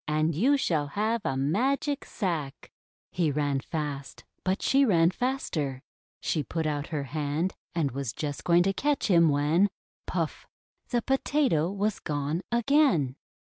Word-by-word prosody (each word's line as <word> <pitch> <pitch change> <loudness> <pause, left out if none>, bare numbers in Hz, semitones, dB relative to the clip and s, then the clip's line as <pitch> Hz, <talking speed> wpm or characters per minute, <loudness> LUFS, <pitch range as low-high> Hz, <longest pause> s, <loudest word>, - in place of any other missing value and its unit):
And 155 +2 +1
you 255 - +3
shall 155 - 0
have 220 +2 +1
a 135 - -1
Magic 265 - 0
Sack!'' 165 - -4 0.4
He 170 -3 +1
ran 145 -1 0
fast, 145 -2 -5 0.2
but 190 +1 -1
she 275 +1 +4
ran 170 -8 +4
faster. 160 - -2 0.4
She 155 - 0
put 160 +4 -3
out 145 -1 -1
her 150 -4 -3
hand, 150 +5 -2 0.2
and 155 -5 +1
was 135 -2 -3
just 145 +3 -4
going 175 0 +4
to 195 +1 +1
catch 285 -1 0
him, 170 -2 +6
when 150 +7 +3 0.2
— - - -67
puff! - - -3 0.4
the 240 -2 0
Potato 270 - +1
was 205 +2 -1
gone 150 +3 -2
again 235 - +3
165 Hz, 150 wpm, -28 LUFS, 145-215 Hz, 0.4 s, him